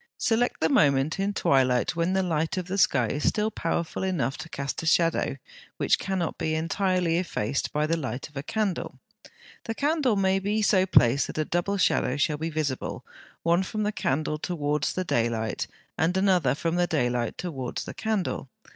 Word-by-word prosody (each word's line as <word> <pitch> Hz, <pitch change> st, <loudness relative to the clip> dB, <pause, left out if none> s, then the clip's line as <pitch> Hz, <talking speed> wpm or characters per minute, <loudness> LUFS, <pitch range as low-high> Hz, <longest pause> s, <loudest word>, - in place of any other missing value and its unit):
Select 240 Hz, +2 st, +1 dB
the 160 Hz, -, +4 dB
moment 140 Hz, +2 st, +3 dB
in 195 Hz, +1 st, +1 dB
twilight 130 Hz, -7 st, +2 dB
when 170 Hz, +2 st, 0 dB
the 190 Hz, 0 st, +2 dB
light 160 Hz, -1 st, -1 dB
of 185 Hz, -, -2 dB
the 195 Hz, +2 st, -2 dB
sky 130 Hz, -9 st, +4 dB
is 145 Hz, +7 st, -1 dB
still 215 Hz, +1 st, -1 dB
powerful 170 Hz, -3 st, -2 dB
enough 160 Hz, -9 st, -1 dB
to 165 Hz, -, -7 dB
cast 140 Hz, -2 st, -4 dB
a 165 Hz, -, -4 dB
shadow 165 Hz, -4 st, +2 dB, 0.4 s
which -, -, +2 dB
cannot 190 Hz, -4 st, -2 dB
be 155 Hz, 0 st, 0 dB
entirely 175 Hz, +1 st, +1 dB
effaced 135 Hz, -, -2 dB
by 150 Hz, +1 st, +1 dB
the 165 Hz, +2 st, +1 dB
light 130 Hz, -5 st, -4 dB
of 150 Hz, -, -24 dB
a 140 Hz, -, -3 dB
candle. 200 Hz, +3 st, -2 dB, 0.7 s
The 225 Hz, -, -3 dB
candle 290 Hz, -4 st, +1 dB
may 190 Hz, -1 st, +2 dB
be 210 Hz, +3 st, 0 dB
so 190 Hz, -2 st, +3 dB
placed 130 Hz, -5 st, +4 dB
that -, -, -7 dB
a 155 Hz, -, +1 dB
double 175 Hz, +5 st, -1 dB
shadow 150 Hz, -6 st, +2 dB
shall 150 Hz, +1 st, +1 dB
be 160 Hz, +1 st, -2 dB
visible, 150 Hz, -5 st, -3 dB, 0.4 s
one 170 Hz, +2 st, +3 dB
from 215 Hz, +3 st, -3 dB
the 210 Hz, -, 0 dB
candle 155 Hz, -4 st, -1 dB
towards 150 Hz, -4 st, -1 dB
the 185 Hz, -, -1 dB
daylight, 115 Hz, -7 st, -1 dB, 0.3 s
and 170 Hz, +4 st, +2 dB
another 180 Hz, -9 st, +3 dB
from 165 Hz, +3 st, -1 dB
the 175 Hz, 0 st, +2 dB
daylight 120 Hz, -7 st, 0 dB
towards 135 Hz, -9 st, -4 dB
the -, -, -7 dB
candle. 215 Hz, -10 st, -2 dB
165 Hz, 185 wpm, -26 LUFS, 140-190 Hz, 0.7 s, the